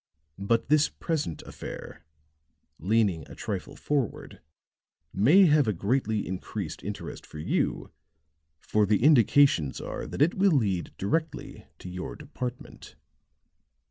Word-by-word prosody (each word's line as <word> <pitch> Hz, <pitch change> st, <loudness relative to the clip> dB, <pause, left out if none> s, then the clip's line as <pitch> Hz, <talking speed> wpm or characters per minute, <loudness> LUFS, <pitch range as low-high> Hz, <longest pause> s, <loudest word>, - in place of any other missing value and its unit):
But 105 Hz, +4 st, +1 dB
this 150 Hz, +2 st, +4 dB
present 155 Hz, -, -3 dB
affair," -, -, -9 dB, 0.8 s
leaning 100 Hz, -3 st, +1 dB
a -, -, -10 dB
trifle -, -, -5 dB
forward, 140 Hz, -6 st, -3 dB, 0.7 s
"may 150 Hz, -, +6 dB
have 150 Hz, -5 st, +4 dB
a 105 Hz, -, +2 dB
greatly 110 Hz, +3 st, 0 dB
increased 95 Hz, -3 st, -5 dB
interest 100 Hz, +2 st, -6 dB
for -, -, -12 dB
you, 75 Hz, -, -1 dB, 0.7 s
for 105 Hz, +6 st, +1 dB
the 105 Hz, +3 st, +2 dB
indications 135 Hz, -, +4 dB
are -, -, -5 dB
that 140 Hz, -, +1 dB
it 170 Hz, -, +2 dB
will 195 Hz, -1 st, +3 dB
lead 100 Hz, -, 0 dB
directly 155 Hz, -, -3 dB
to -, -, -11 dB
your 90 Hz, 0 st, -6 dB
department." 125 Hz, -4 st, -8 dB
110 Hz, 120 wpm, -27 LUFS, 95-145 Hz, 0.8 s, may